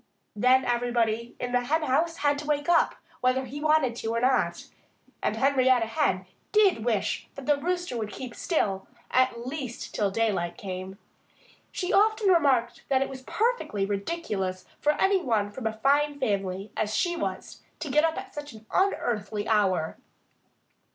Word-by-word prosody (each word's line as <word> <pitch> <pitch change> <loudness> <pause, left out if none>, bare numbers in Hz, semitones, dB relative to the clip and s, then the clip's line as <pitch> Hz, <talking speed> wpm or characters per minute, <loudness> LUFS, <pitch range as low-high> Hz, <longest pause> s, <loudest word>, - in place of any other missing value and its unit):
Then 255 +4 +4
everybody 235 -1 0
in 245 - -3
the 245 0 +2
henhouse 315 +3 +1
had 290 -1 +1
to 300 - -7
wake 290 -1 0
up, 340 -1 +3 0.2
whether 255 +1 +1
he 280 +4 -7
wanted 305 -6 +3
to 225 0 -2
or - - +2
not. 255 +2 +1 0.6
And - - 0
Henrietta 260 -3 +3
Hen 190 -4 0 0.3
did 400 - +4
wish 225 -4 -1
the 280 +2 +1
Rooster 350 0 -2
would 215 -3 -3
keep 245 +4 -7
still 200 - -1 0.2
at 250 -2 +2
least 260 -3 -5
till 205 -2 +1
daylight 195 -5 -1
came. 185 0 -6 0.7
She 365 +1 -2
often 430 0 +4
remarked 275 -9 +3
that 265 -1 +3
it - - -6
was 265 -1 -8
perfectly 425 - 0
ridiculous 200 - -3
for 300 - +3
any 385 +4 +2
one 215 -8 0
from 225 +1 -4
a 220 - -2
fine 285 +4 +2
family 195 -3 -2
as 215 0 -1
she 345 -1 +1
was 335 - -5 0.2
to 295 - -5
get 300 +3 +4
up 325 0 +1
at 390 - -7
such 295 -3 -7
an 220 0 -14
unearthly 215 - 0
hour. 190 -7 +1
255 Hz, 160 wpm, -27 LUFS, 215-300 Hz, 0.7 s, Then